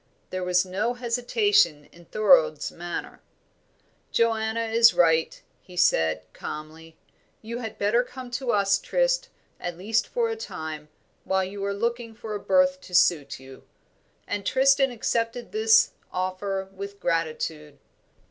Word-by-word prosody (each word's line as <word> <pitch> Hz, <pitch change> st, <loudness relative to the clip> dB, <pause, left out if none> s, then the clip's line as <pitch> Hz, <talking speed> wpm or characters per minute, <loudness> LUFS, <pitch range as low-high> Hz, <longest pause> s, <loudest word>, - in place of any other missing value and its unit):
There 185 Hz, 0 st, -3 dB
was 180 Hz, 0 st, +2 dB
no 210 Hz, +6 st, -2 dB
hesitation 245 Hz, -, +1 dB
in 170 Hz, 0 st, -17 dB
Thorold's 480 Hz, -, +3 dB
manner. -, -, -6 dB, 0.9 s
"Joanna 225 Hz, 0 st, +1 dB
is 230 Hz, +1 st, +5 dB
right," 160 Hz, -2 st, +3 dB, 0.2 s
he 180 Hz, -1 st, -14 dB
said, 80 Hz, -, +2 dB
calmly, 160 Hz, +1 st, -9 dB, 0.5 s
"you 235 Hz, +2 st, -5 dB
had 225 Hz, -3 st, -6 dB
better 210 Hz, +4 st, +2 dB
come 255 Hz, 0 st, -10 dB
to 250 Hz, +1 st, -4 dB
us, 200 Hz, -1 st, +2 dB
Trist, -, -, 0 dB, 0.3 s
at 175 Hz, -1 st, -5 dB
least 215 Hz, +5 st, 0 dB
for 475 Hz, -2 st, 0 dB
a 450 Hz, -, -2 dB
time, 155 Hz, -, -7 dB, 0.3 s
while 190 Hz, 0 st, +1 dB
you 195 Hz, +1 st, -6 dB
are 200 Hz, -, -1 dB
looking 230 Hz, +2 st, -3 dB
for 220 Hz, -1 st, -7 dB
a 205 Hz, -, -3 dB
berth 275 Hz, +4 st, +2 dB
to 180 Hz, -, -7 dB
suit 160 Hz, -7 st, +3 dB
you;" 130 Hz, 0 st, -13 dB, 0.6 s
and 205 Hz, -, -3 dB
Tristram 270 Hz, +4 st, +3 dB
accepted 235 Hz, 0 st, -2 dB
this 445 Hz, +1 st, +4 dB, 0.2 s
offer 190 Hz, +1 st, -3 dB
with 200 Hz, +1 st, -8 dB
gratitude. 155 Hz, -3 st, -2 dB
210 Hz, 140 wpm, -25 LUFS, 175-245 Hz, 0.9 s, is